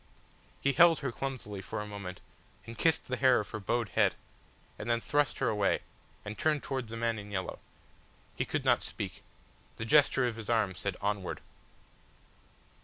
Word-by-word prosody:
He 140 - +2
held 170 -1 +6
her 135 -3 -1
clumsily 115 -7 -4
for 105 +3 -5
a 105 - -3
moment, 100 -3 -7 0.4
and 115 - -8
kissed 160 +8 +2
the 130 - -2
hair 130 -1 +5
of 105 - -5
her 110 - -4
bowed 115 +2 0
head, - - +3 0.6
and 105 - -4
then 115 0 +3
thrust 145 +3 +1
her - - +1
away, 105 -3 +2 0.4
and 105 +1 -5
turned 150 +1 +1
towards 130 -4 -3
the 115 - -5
man 115 -1 0
in 105 0 -9
yellow. 95 -2 -3 0.8
He - - 0
could - - -2
not - - +4
speak. - - -5 0.6
The 115 - -3
gesture 140 0 +5
of 120 -2 -2
his 115 -1 -7
arm 110 -5 +2
said 95 +1 -3
"Onward." 100 -2 -1
115 Hz, 180 wpm, -31 LUFS, 105-130 Hz, 0.8 s, held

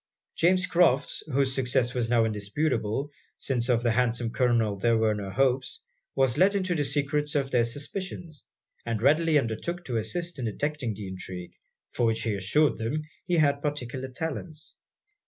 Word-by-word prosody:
James 185 +2 +3
Crofts, 170 -7 +2
whose 135 0 +2
success 125 -1 +1
was 120 -2 0
now 115 -2 +4
indisputable, 110 +4 -1 0.3
since 125 -2 -1
of 120 -1 +3
the 120 - +3
handsome 120 -1 +1
Colonel 115 -5 +2
there 115 +4 +2
were 110 -1 +2
no 100 -2 -4
hopes, 130 +4 +1 0.4
was 135 0 +2
let 195 +3 +5
into 185 -2 0
the 150 -4 0
secret 145 +1 -1
of 140 -1 0
their 120 -2 +4
suspicions; 155 +5 -5 0.4
and 115 -2 -2
readily 155 +5 +4
undertook 145 +9 -2
to 120 -3 -1
assist 165 +9 -3
in 125 - -2
detecting 130 0 -2
the 100 -1 -7
intrigue, 90 -1 -7 0.4
for 120 - +2
which 110 0 0
he 110 - 0
assured 115 +8 +2
them 140 +8 -2 0.2
he 175 - +2
had 145 -2 +3
particular 130 -3 -3
talents. 155 +3 -5
130 Hz, 165 wpm, -27 LUFS, 115-150 Hz, 0.4 s, let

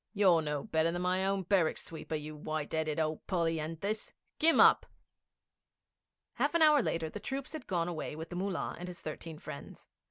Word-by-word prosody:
You're 185 -5 +5
no 150 -2 -2
better 160 +1 +1
than 175 +1 -2
my 185 +1 +2
own 195 -1 0
barrack 180 -3 +2
sweeper, 160 -1 -5
you 150 0 -5
white 155 0 -4
'eaded 155 -1 0
old 155 -1 -2
polyanthus! 165 +4 -1 0.3
Kim 325 +1 +5
up!' - - +7 1.5
Half - - 0
an 335 - +5
hour 300 -2 +7
later 165 -7 -1
the 210 - -7
troops 270 +6 -5
had 310 -5 -7
gone 175 -3 0
away 160 -3 -4
with 160 +1 -7
the 175 - -6
Mullah 190 0 -2
and 180 - -6
his 180 -1 -8
thirteen 155 +1 -6
friends. 150 -2 -9
165 Hz, 185 wpm, -32 LUFS, 155-195 Hz, 1.5 s, up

